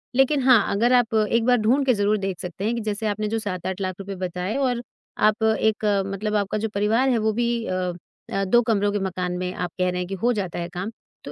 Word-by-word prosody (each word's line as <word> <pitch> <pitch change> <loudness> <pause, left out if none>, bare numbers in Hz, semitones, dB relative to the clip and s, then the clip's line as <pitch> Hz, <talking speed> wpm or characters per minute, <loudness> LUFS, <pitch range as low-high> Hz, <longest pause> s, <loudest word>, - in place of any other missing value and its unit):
लेकिन 270 +2 +3
हाँ, 255 -3 +7 0.2
अगर 240 +5 +3
आप 240 -2 +3
एक 220 +1 +2
बार 250 0 +4
ढूँढ 260 +6 +2
के 255 - +4
ज़रूर 205 0 +1
देख 195 -3 -3
सकते 180 +2 -5
हैं 230 - +1
कि 235 - -3
जैसे 215 +1 -2
आपने 210 +1 -1
जो 225 +1 -1
7-8 190 -2 -4
हज़ार 185 -1 -1
रुपए 195 0 -7
लाख 190 - -8
बताए 180 +4 -3
और 250 -3 0 0.5
आप 215 +1 -3
एक 220 -1 +1 0.2
मतलब 210 +2 -3
आपका 205 0 0
जो 220 +1 -2
परिवार 220 +6 +2
है, 245 - +2
वे 220 0 +1
भी 235 0 0
अ 185 -1 -2 0.4
अ, 195 - +1
2 240 +5 +4
कमरों 205 -3 +1
के 205 - -1
मकान 180 -1 -2
में 180 0 -3
आप 180 -1 -3
कह 180 0 +2
रहे 180 0 -2
हैं 180 - -3
कि 195 - -4
हो 245 - +4
जाता 190 -6 -3
है 170 0 -4
काम, 180 +5 -5 0.3
तो - - -7
210 Hz, 255 wpm, -23 LUFS, 190-230 Hz, 0.5 s, हाँ